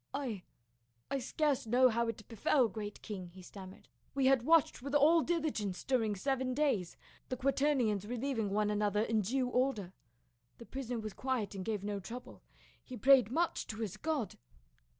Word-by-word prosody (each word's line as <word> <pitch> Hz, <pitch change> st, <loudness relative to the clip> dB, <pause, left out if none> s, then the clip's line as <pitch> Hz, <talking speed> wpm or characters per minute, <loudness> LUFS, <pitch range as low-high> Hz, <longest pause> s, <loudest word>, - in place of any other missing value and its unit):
" -, -, -45 dB
I 250 Hz, -9 st, -3 dB, 0.4 s
— 115 Hz, 0 st, -43 dB
I 275 Hz, -, 0 dB
scarce 285 Hz, -1 st, 0 dB
know 255 Hz, +3 st, +5 dB
how 235 Hz, 0 st, 0 dB
it 220 Hz, -2 st, -5 dB
befell, 240 Hz, +3 st, +2 dB
great 205 Hz, +1 st, -7 dB
king," 195 Hz, -5 st, -6 dB
he 185 Hz, -, -11 dB
stam 190 Hz, +1 st, -10 dB
mered. 190 Hz, -, -16 dB, 0.3 s
"We 275 Hz, -1 st, +2 dB
had 265 Hz, -2 st, +5 dB
watched 320 Hz, +1 st, +3 dB
with 280 Hz, +2 st, -3 dB
all 315 Hz, +4 st, +6 dB
diligence 295 Hz, -, -1 dB
during 225 Hz, -6 st, +1 dB
seven 260 Hz, +4 st, -1 dB
days, 260 Hz, -, 0 dB, 0.3 s
the 255 Hz, -, -2 dB
quaternions 255 Hz, -6 st, +1 dB
relieving 240 Hz, -2 st, -2 dB
one 210 Hz, +1 st, +1 dB
another 210 Hz, 0 st, +1 dB
in 225 Hz, -1 st, +1 dB
due 250 Hz, +6 st, 0 dB
order. 245 Hz, -7 st, 0 dB, 0.6 s
The 235 Hz, -, -11 dB
prisoner 250 Hz, -2 st, -4 dB
was 215 Hz, -2 st, -5 dB
quiet 255 Hz, -6 st, -2 dB
and 190 Hz, -2 st, -5 dB
gave 210 Hz, -1 st, -2 dB
no 205 Hz, 0 st, -2 dB
trou 230 Hz, +6 st, -6 dB
ble; -, -, -15 dB, 0.4 s
he 255 Hz, -, -8 dB
prayed 265 Hz, -4 st, +6 dB
much 330 Hz, +7 st, 0 dB
to 220 Hz, -, -6 dB
his 215 Hz, -4 st, -3 dB
God. 295 Hz, -1 st, -2 dB
235 Hz, 185 wpm, -33 LUFS, 210-270 Hz, 0.6 s, all